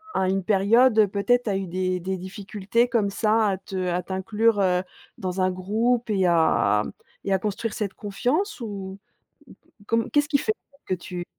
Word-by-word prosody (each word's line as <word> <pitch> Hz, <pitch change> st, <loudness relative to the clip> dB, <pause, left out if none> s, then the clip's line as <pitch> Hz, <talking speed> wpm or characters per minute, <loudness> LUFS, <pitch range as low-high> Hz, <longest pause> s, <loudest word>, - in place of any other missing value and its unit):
à 190 Hz, -1 st, +2 dB
une 195 Hz, 0 st, 0 dB
période, 220 Hz, +5 st, +4 dB
heu, 215 Hz, -2 st, +6 dB
peut-être 245 Hz, +5 st, +1 dB
tu 215 Hz, -, -3 dB
as 195 Hz, -, 0 dB
eu 195 Hz, -1 st, -4 dB
des 185 Hz, +1 st, -1 dB
des 190 Hz, +2 st, -3 dB
difficultés 200 Hz, +4 st, -1 dB
comme 230 Hz, -4 st, +1 dB
ça 220 Hz, +2 st, +2 dB
à 190 Hz, -, -1 dB
te 185 Hz, -1 st, -4 dB
à 180 Hz, +1 st, 0 dB
t'inclure, 205 Hz, +4 st, +1 dB
heu, 180 Hz, -1 st, +2 dB, 0.4 s
dans 185 Hz, 0 st, -3 dB
un 185 Hz, 0 st, +2 dB
groupe 225 Hz, +6 st, 0 dB
et 195 Hz, -3 st, +2 dB
à 160 Hz, -11 st, +3 dB, 0.4 s
et 195 Hz, -, +1 dB
à 190 Hz, -, +2 dB
construire 210 Hz, +3 st, -3 dB
cette 200 Hz, -3 st, -3 dB
confiance 260 Hz, -, -2 dB
ou? 195 Hz, -3 st, -6 dB, 0.9 s
Com 230 Hz, 0 st, +1 dB
qu'est-ce 290 Hz, 0 st, +2 dB
qui 290 Hz, -2 st, +3 dB
fait 435 Hz, -, 0 dB, 0.3 s
que -, -, 0 dB
tu 175 Hz, 0 st, -6 dB
200 Hz, 185 wpm, -24 LUFS, 185-225 Hz, 0.9 s, heu